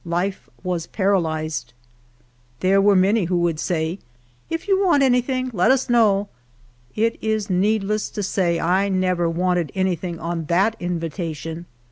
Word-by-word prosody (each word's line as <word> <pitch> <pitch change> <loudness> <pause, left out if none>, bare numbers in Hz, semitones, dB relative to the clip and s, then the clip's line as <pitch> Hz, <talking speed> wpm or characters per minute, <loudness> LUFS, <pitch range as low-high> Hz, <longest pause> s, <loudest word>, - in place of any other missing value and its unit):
Life 180 +3 -3
was 180 -3 -2
paralyzed. 160 - -1 0.9
There 195 +1 +4
were 200 0 +4
many 195 +2 +3
who 175 +1 0
w^ould 165 -3 0
say, 165 +1 -2 0.3
" 120 0 -36
If 330 +4 -4
you 390 0 +3
want 340 -7 +4
anything, 255 0 +1
let 180 +1 +2
us 265 -1 +2
know." 205 -4 +3 0.7
It 230 +1 0
is 215 -2 -1
needless 210 +2 +1
to 205 - -1
say 175 -3 0
I 185 +4 +1
never 185 -2 +1
wanted 175 -2 0
anything 185 -2 -1
on 165 0 -3
that 195 +8 +2
invitation. 165 -1 -4
185 Hz, 145 wpm, -22 LUFS, 170-210 Hz, 0.9 s, There